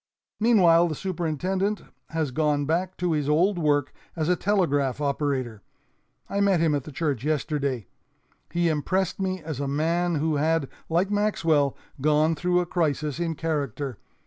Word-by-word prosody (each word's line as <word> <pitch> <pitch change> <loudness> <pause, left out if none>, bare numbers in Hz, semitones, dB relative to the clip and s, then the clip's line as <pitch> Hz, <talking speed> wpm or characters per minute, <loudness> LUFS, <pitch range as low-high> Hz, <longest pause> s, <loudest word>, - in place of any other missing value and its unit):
Meanwhile, 180 -7 +5
the 155 - -3
superintendent 185 +4 -2 0.3
has 160 -4 -1
gone 150 0 +1
back 175 +5 -1
to 180 -1 0
his 150 -2 0
old 175 +5 +3
work 145 -3 +1 0.2
as 160 -1 -1
a 180 - +4
telegraph 145 - +1
operator. 140 -6 -1 0.7
I 200 - -1
met 195 -3 +3
him 160 -2 +2
at 140 -3 -1
the 155 - -8
church 140 -5 -2
yesterday. 140 - -1 0.7
He 175 0 +1
impressed 175 +5 0
me 185 -2 -2
as 155 -4 -5
a 140 - -2
man 165 +5 0
who 155 0 0
had, 160 -1 +1 0.2
like 175 +5 +1
Maxwell, 165 -9 +1 0.2
gone 155 +2 +3
through 180 +2 +1
a - - -2
crisis 155 -3 -1
in 165 -2 -1
character. 145 -6 -3
160 Hz, 155 wpm, -25 LUFS, 145-175 Hz, 0.7 s, Meanwhile